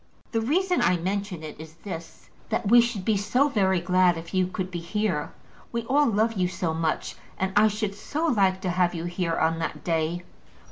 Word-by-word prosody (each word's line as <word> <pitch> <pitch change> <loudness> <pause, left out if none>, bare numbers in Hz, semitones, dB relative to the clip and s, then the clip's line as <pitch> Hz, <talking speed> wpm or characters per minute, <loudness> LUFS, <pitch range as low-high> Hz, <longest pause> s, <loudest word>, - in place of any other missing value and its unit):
"The 225 - 0
reason 360 +9 +1
I 180 - +3
mention 190 -1 -3
it 155 -1 -8
is 160 0 -10
this, 170 -5 -8 0.2
that 210 - -1
we 240 +1 +8
should 230 -5 -2
be 220 - +3
so 245 +9 +2
very 190 -7 +2
glad 180 0 +3
if 165 +2 -9
you 185 -1 +2
could 185 0 -4
be 175 - -3
here. 170 -3 -1 0.4
We 235 0 -2
all 285 +5 +3
love 225 +1 +2
you 185 -4 +1
so 175 -2 -2
much, 160 -1 -1 0.2
and 190 0 -1
I 210 +1 +6
should 210 -1 -2
so 290 +10 -3
like 195 - +2
to 185 - -1
have 180 0 +1
you 165 - -4
here 175 -1 -1
on 165 +1 +1
that 165 - -4
day." 165 +1 -1
190 Hz, 205 wpm, -26 LUFS, 170-215 Hz, 0.4 s, we